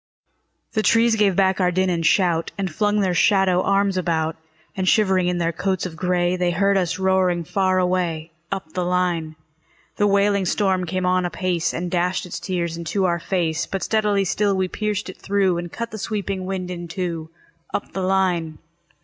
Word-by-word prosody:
The 220 - +1
trees 230 +1 +4
gave 205 -4 +2
back 190 0 +2
our 180 - +3
din 185 +1 +1
and 170 -1 -1
shout, 170 0 +2
And 190 -4 -3
flung 210 +3 +1
their 185 -2 +1
shadow 190 -1 +3
arms 195 0 +1
about; 165 -3 0 0.4
And 185 -1 +1
shivering 190 -4 +3
in 180 0 0
their 170 -1 0
coats 190 +3 -2
of 175 -3 -6
gray, 180 +1 +1
They 180 -1 0
heard 195 +3 +2
us 180 -3 0
roaring 185 -2 +2
far 185 +2 +1
away, 175 -3 0 0.2
Up 190 -5 -5
the 180 - -1
line. 175 -3 0 0.6
The 205 - +3
wailing 200 -1 +2
storm 185 -1 +1
came 185 +2 -2
on 185 0 +2
apace, 175 -1 -1
And 175 +1 -4
dashed 180 +1 0
its 180 - -6
tears 170 -2 -3
into 170 +4 -1
our 170 -1 +1
fade; 170 -2 -1
But 195 - -2
steadily 210 -3 +1
still 200 +2 +1
we 185 0 +1
pierced 210 +1 -3
it 185 - -8
through, 195 -3 +1
And 175 -1 -6
cut 235 0 -5
the 215 - -6
sweeping 195 -2 -3
wind 185 -1 -3
in 175 -1 -6
two, 170 -3 -4 0.4
Up - - -4
the 190 - -3
line. 180 -4 0
185 Hz, 190 wpm, -22 LUFS, 175-195 Hz, 0.6 s, trees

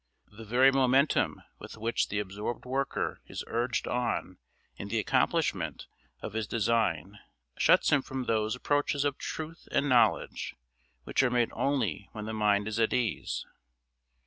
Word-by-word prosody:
The 110 +1 -10
very 125 +5 +5
momentum 135 +2 +2 0.2
with - - -10
which 115 +2 0
the 100 - -2
absorbed 105 +4 -4
worker 135 +2 -2
is - - -5
urged 120 +1 -1
on 120 -6 -2 0.4
in - - -7
the - - -1
accomplishment - - 0 0.4
of - - -5
his 110 -1 -2
design 105 -5 0 0.4
shuts - - +5
him 145 - +4
from 130 0 -4
those 110 -1 0
approaches 145 +2 0
of 145 -1 -1
truth 160 +1 -6
and 140 0 +2
knowledge 125 -3 +2 0.5
which - - +1
are 130 - +3
made 120 -1 +1
only 115 - -1
when 105 -1 -6
the 110 - -4
mind 105 -1 +2
is 110 +1 -2
at 115 - +2
ease. 120 -4 -1
115 Hz, 150 wpm, -29 LUFS, 105-135 Hz, 0.5 s, very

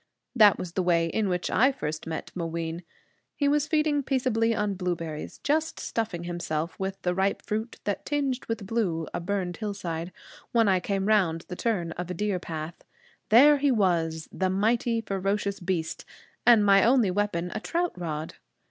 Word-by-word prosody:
That 210 -4 +7
was 175 - -5
the 185 - -1
way 170 -2 +3
in 200 +4 -1
which 180 -1 -1
I 260 +4 +4
first 155 - -5
met 160 - -5
Mooween. 165 -1 -3 0.5
He 285 - +1
was 295 +1 +2
feeding 305 -2 +2
peaceably 245 -4 +1
on 210 -1 0
blueberries, 170 -4 -4
just 315 +2 0
stuffing 215 -7 -3
himself 170 -2 -3
with 195 0 -3
the 180 - +1
ripe 190 +2 0
fruit 220 +2 -4
that 205 - -2
tinged 275 -4 -1
with 225 -3 -3
blue 190 -7 -1
a - - -2
burned 180 -1 -2
hillside, 180 -5 -4 0.4
when 230 -2 +4
I 190 -2 +4
came 195 +1 -2
round 185 -6 +2
the 180 - -4
turn 180 -6 -1
of 180 +1 -5
a 180 - -3
deer 205 0 -1
path. 160 -1 -6 0.5
There 285 +7 +7
he 285 +1 +3
was, 170 -8 +1
the 185 0 0
mighty, 230 +4 +1
ferocious 200 0 -2
beast 175 -3 -2 0.4
and 230 -4 +7
my 195 -1 +6
only 235 -5 +4
weapon 180 -3 -1
a 215 - -2
trout 345 +8 -1
rod! 160 -3 -4
195 Hz, 175 wpm, -27 LUFS, 170-225 Hz, 0.5 s, That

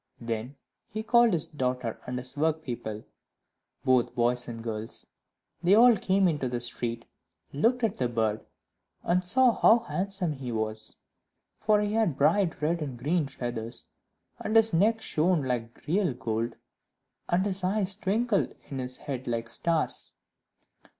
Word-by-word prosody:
Then 115 +3 -4 0.3
he 215 +1 -4
called 235 0 +5
his 165 -4 +1
daughter 125 -5 -3
and 125 0 -3
his 125 0 -6
workpeople, 145 -8 -2 0.8
both 130 -2 +3
boys 125 +1 +1
and 115 -1 -7
girls; 110 -1 -5 0.6
they 180 +3 +5
all 235 +1 +7
came 190 -1 +2
into 145 -6 0
the 120 0 -2
street, 120 -1 -3 0.5
looked 235 - +2
at 220 -3 +1
the 125 -2 0
bird, 110 -2 0 0.6
and 180 +1 +2
saw 250 +7 +5
how 225 - +6
handsome 195 -6 -2
he 130 -3 -6
was; 110 -1 -3 0.6
for 210 -1 +3
he 210 0 -1
had 215 -11 +1
bright 165 +2 +2
red 165 +2 +1
and 135 -5 -4
green 150 +5 0
feathers, 120 -3 -4 0.5
and 215 - -3
his 225 -2 +5
neck 215 +6 +3
shone 170 -4 +1
like 120 -3 -4
real 180 -4 +1
gold, 115 -1 -2 0.7
and 180 +3 +2
his 195 -1 -1
eyes 195 +1 +1
twinkled 210 +2 0 0.2
in 135 - -3
his 125 0 -3
head 130 -3 -6
like 115 -1 -2
stars. 165 +4 -1
150 Hz, 150 wpm, -28 LUFS, 120-195 Hz, 0.8 s, all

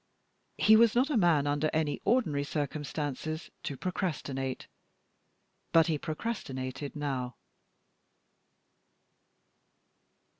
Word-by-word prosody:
He 220 - +6
was 230 0 +5
not 260 +5 +3
a - - +1
man 170 -9 +4
under 145 +2 +1
any 155 -2 0
ordinary 185 - +2
circumstances 150 +1 -3
to 140 - -4
procrastinate, 140 -8 -3 1.1
but 165 -1 +6
he 160 -3 0
procrastinated 140 - -4
now. 130 -5 -3
150 Hz, 85 wpm, -30 LUFS, 140-175 Hz, 1.1 s, He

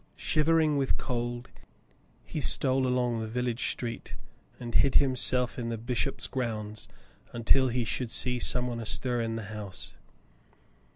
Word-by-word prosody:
Shivering 155 -1 +2
with 135 -2 +1
cold, 120 0 -3 0.7
he - - -4
stole 130 -1 +3
along 125 -2 +1
the 110 - -3
village 120 +1 -1
street 115 -2 -5 0.4
and 120 -1 -6
hid 135 +2 +3
himself 130 -2 +3
in 115 -1 -3
the 115 - -2
bishop's 120 +4 -2
grounds 110 -4 -4 0.5
until 125 +3 +3
he 120 -1 0
should 120 +2 -2
see 125 +1 0
some 125 +1 +2
one 120 -1 -3
astir 120 +2 -1
in 115 0 -2
the 115 - -4
house. 105 -3 -5
120 Hz, 140 wpm, -29 LUFS, 115-130 Hz, 0.7 s, stole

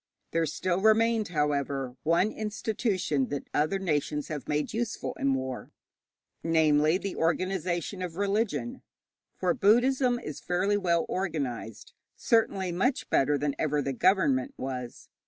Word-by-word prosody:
There 165 -1 +1
still 180 +4 -1
remained, 220 0 +3
however, 140 -5 -1
one 170 +6 +2
institution 210 - -1
that 145 -1 -5
other 155 +6 +1
nations 150 -5 -1
have 145 -5 -5
made 150 +5 -1
useful 230 0 -3
in 135 -1 +2
war, 130 -1 -4 0.7
namely, 155 0 +3
the 195 0 -5
organization 180 +1 -1
of 175 -3 -4
religion. 215 +5 -1 0.6
For 180 -2 +1
Buddhism 245 +5 +3
is 155 - -7
fairly 185 +3 0
well 170 -4 +1
organized 135 - -4 0.2
certainly 195 -5 +1
much 205 +10 0
better 145 +2 +3
than 145 0 -1
ever 150 -1 +1
the 140 -1 -1
government 150 -5 +2
was. 125 -2 -6
170 Hz, 130 wpm, -28 LUFS, 145-200 Hz, 0.7 s, remained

